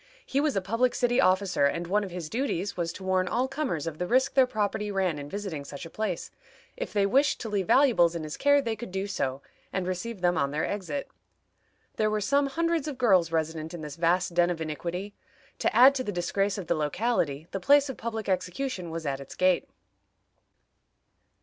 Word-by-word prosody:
He 275 - 0
was 300 -2 +1
a 195 - +1
public 230 +6 +1
city 245 0 +2
officer, 185 -4 +3
and 165 +4 -2
one 205 +4 +1
of 195 - -5
his 175 -3 -6
duties 205 - -2
was 170 -2 -2
to 190 - -10
warn 185 -1 +1
all 250 +7 0
comers 265 - -2
of 160 -2 -5
the 180 - -1
risk 260 +4 +2
their 265 -2 +5
property 210 -2 -1
ran 190 -6 0
in 145 0 -7
visiting 195 -7 -4
such 140 +2 -8
a 165 - -10
place. 210 -5 -3 0.4
If - - -5
they 200 -1 +2
wished 275 +8 +3
to 225 - -4
leave 200 -4 -1
valuables 230 -12 +4
in 165 - -3
his 155 0 -5
care 285 0 +4
they 230 -3 -1
could 215 -2 -8
do 190 +1 -2
so, 140 -9 -3 0.3
and 190 -2 -2
receive 185 +3 -4
them 175 -1 +2
on 140 - +1
their 150 +2 -1
exit. 205 +8 -4 0.9
There 215 0 +2
were 215 0 0
some 280 +7 +2
hundreds 335 +1 0
of 290 -4 -4
girls 190 -9 +3
resident 160 0 -2
in 170 - -7
this 150 -2 -7
vast 175 +1 +1
den 175 0 +3
of 175 -2 -2
iniquity. 170 +5 -4 0.5
To - - 0
add 260 +3 +8
to 265 -2 -2
the 210 - -3
disgrace 195 +3 -1
of 195 - -5
the 170 - +1
locality, 155 - -1
the 195 - -3
place 285 +8 +5
of 265 - -5
public 225 -2 -4
execution 185 +2 -2
was 165 0 -5
at 135 -1 -2
its 140 - -10
gate. 185 -1 +2
190 Hz, 215 wpm, -27 LUFS, 170-240 Hz, 0.9 s, add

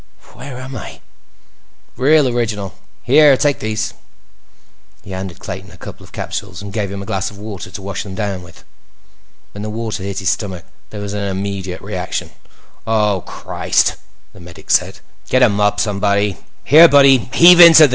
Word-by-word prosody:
"Where 135 -2 -9
am 130 +1 -8
I?" 110 - -9 1.0
"Real 145 +3 +3
original. 110 -5 -2 0.3
Here, 150 -3 +5
take 145 0 +1
these." 110 +1 -3 1.1
He 95 - -11
handed 95 -1 -6
Clayton 95 0 -8
a 90 - -15
couple - - -11
of - - -16
capsules, 95 -3 -6
and 100 -1 -9
gave 105 -3 -3
him 100 0 -6
a - - -10
glass 95 -1 -2
of 100 - -14
water 105 -2 -8
to 100 - -8
wash 95 -2 -4
them 95 -2 -8
down 100 -3 -3
with. 90 -1 -16 0.9
When 105 - -9
the 110 - -5
water 110 -1 -4
hit 100 0 -5
his 95 -2 0
stomach, 95 -5 -5 0.2
there 105 - -8
was 100 0 -5
an 105 -1 -3
immediate 95 -1 -4
reaction. - - -5 0.6
"Oh, 105 -4 +1
Christ!" - - 0 0.4
the - - -15
medic 85 -1 -10
said. - - +1 0.3
"Get 130 0 +3
a - - +6
mop, 105 0 0
somebody. 100 -1 0 0.3
Here, 160 +5 +8
bud; 140 -3 +6
heave 135 +7 +6
into 165 -2 +10
this." - - +1
105 Hz, 175 wpm, -17 LUFS, 95-120 Hz, 1.1 s, into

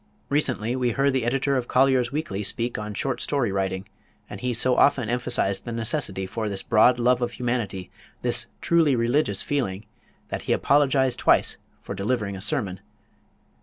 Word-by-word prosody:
Recently 130 -5 0
we 125 -2 0
heard 140 +2 +2
the 130 -3 0
editor 135 +3 +1
of 125 -1 -3
Collier's 130 -1 +3
Weekly 140 -9 -3
speak 115 +3 0
on 105 -1 -6
short 135 +3 -2
story 135 -8 0
writing, 95 0 -2 0.4
and - - -9
he 125 0 -1
so 125 +2 +2
often 130 -6 +3
emphasized 120 -5 0
the 120 - -6
necessity 115 -4 -2
for 110 +3 -3
this 100 -1 -2
broad 120 +3 +4
love 125 +1 +3
for 120 - 0
humanity, 115 -6 -3 0.3
this 120 -1 0
truly 165 -5 +3
religious 115 -3 +1
feeling, 110 -8 -2 0.4
that - - -4
he - - +5
apologized 135 -3 +2
twice - - +3 0.3
for - - -5
delivering 105 -1 -2
a 95 - -8
sermon. 105 -5 -2
120 Hz, 165 wpm, -24 LUFS, 105-130 Hz, 0.4 s, he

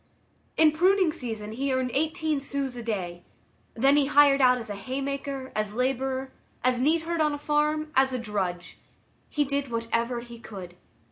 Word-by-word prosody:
In 315 -1 +6
pruning 365 +2 +3
season 225 -8 -5
he 270 +5 -2
earned 260 -1 0
eighteen 315 0 0
sous 275 -2 -3
a 240 - -6
day; 180 -6 -4 0.5
then 275 +5 +4
he 280 -2 +3
hired 285 -1 +5
out 250 -1 +5
as 230 - -6
a 205 - -4
hay 255 +7 -4
maker, 275 -1 -4
as 215 0 -2
laborer, 265 +1 -1 0.3
as 250 -1 +2
neat 315 +4 +3
herd 335 0 -1
on 300 -1 +2
a - - -3
farm, 300 +1 0
as 265 0 +4
a 255 - -1
drudge. 190 -6 -4 0.5
He 295 -1 +1
did 280 0 -1
whatever 230 +1 -1
he 235 -1 -11
could. 190 -6 -9
265 Hz, 180 wpm, -27 LUFS, 230-290 Hz, 0.5 s, In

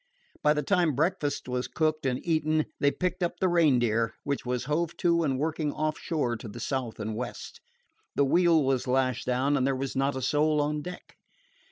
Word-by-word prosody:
By 150 0 +4
the 150 - 0
time 175 -7 +2
breakfast 155 -2 -1
was 125 0 -2
cooked 155 -2 0
and 125 -1 0
eaten 155 -2 +1
they 140 - +4
picked 180 +5 -2
up 175 0 -1
the 190 - +2
Reindeer, 120 -10 +2
which 140 -3 -3
was 125 -1 -1
hove 155 +4 -1
to 170 -1 +2
and 135 -5 0
working 155 +1 -1
offshore 155 -5 -1
to 110 - -9
the 110 +3 -8
south 125 -2 -3
and 110 0 -3
west. 125 +3 -6 0.5
The 140 - +3
wheel 170 +1 +4
was 130 -2 0
lashed 130 -1 0
down, 130 +3 +1
and 135 -1 +2
there 135 - +1
was 135 0 -4
not 135 +1 +1
a 130 - -4
soul 150 +3 +2
on 150 +1 0
deck. 180 +3 -9
145 Hz, 195 wpm, -28 LUFS, 130-155 Hz, 0.5 s, By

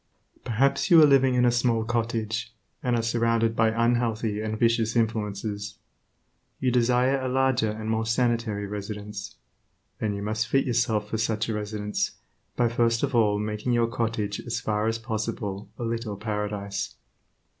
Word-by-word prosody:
Perhaps 135 - +1
you 170 -3 +8
are - - +9
living 135 -3 +4
in 125 0 +4
a 120 - +5
small 120 -2 +1
cottage, 115 -1 -2 0.3
and 125 -1 +1
are 115 - 0
surrounded 115 0 +1
by 115 0 +4
unhealthy 115 -2 0
and 110 0 -3
vicious 115 0 +2
influences. 105 -2 -2 0.8
You 130 - +1
desire 125 +2 +3
a 130 - -2
larger 130 -3 +2
and 110 +1 -5
more 110 0 0
sanitary 115 -3 0
residence. 105 0 -6 0.6
Then 105 -2 -1
you 100 - -5
must 110 +2 -1
fit 135 +3 +2
yourself 115 -4 +1
for 110 - -1
such 110 0 0
a - - 0
residence 105 0 -2 0.4
by 120 - +3
first 115 +1 +1
of 140 -1 0
all 105 -3 +3
making 105 +3 -2
your 120 -1 +3
cottage 115 -3 -2
as 115 -1 -3
far 105 0 -1
as 115 0 0
possible 110 -3 -4
a 120 - -5
little 115 -3 -3
paradise. 105 -1 -3
115 Hz, 160 wpm, -26 LUFS, 105-120 Hz, 0.8 s, are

